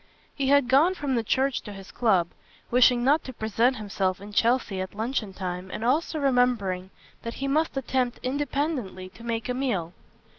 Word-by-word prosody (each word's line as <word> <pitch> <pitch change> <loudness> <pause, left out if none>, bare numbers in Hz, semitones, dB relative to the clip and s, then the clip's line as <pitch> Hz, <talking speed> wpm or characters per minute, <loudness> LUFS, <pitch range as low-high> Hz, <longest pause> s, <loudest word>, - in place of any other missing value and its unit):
He 275 -2 -2
had 285 -2 +4
gone 295 +9 +4
from 285 -5 -2
the 235 -2 +1
church 265 +4 +1
to 210 - -9
his 195 0 -11
club, 190 -8 +2 0.4
wishing 245 0 +5
not 290 +5 +3
to 260 - -7
present 230 +3 +1
himself 195 -4 -2
in 205 +1 -10
Chelsea 230 -4 +1
at 185 +1 -6
luncheon 220 -1 -2
time 185 -1 -5
and 220 - -4
also 310 +5 +1
remembering 245 -9 +1 0.3
that 230 - -6
he 275 - -3
must 305 +1 +1
attempt 255 -2 -1
independently 265 - -2
to 230 - -15
make 230 -1 -3
a 250 - -1
meal. 210 -11 -2
240 Hz, 180 wpm, -26 LUFS, 200-270 Hz, 0.4 s, wishing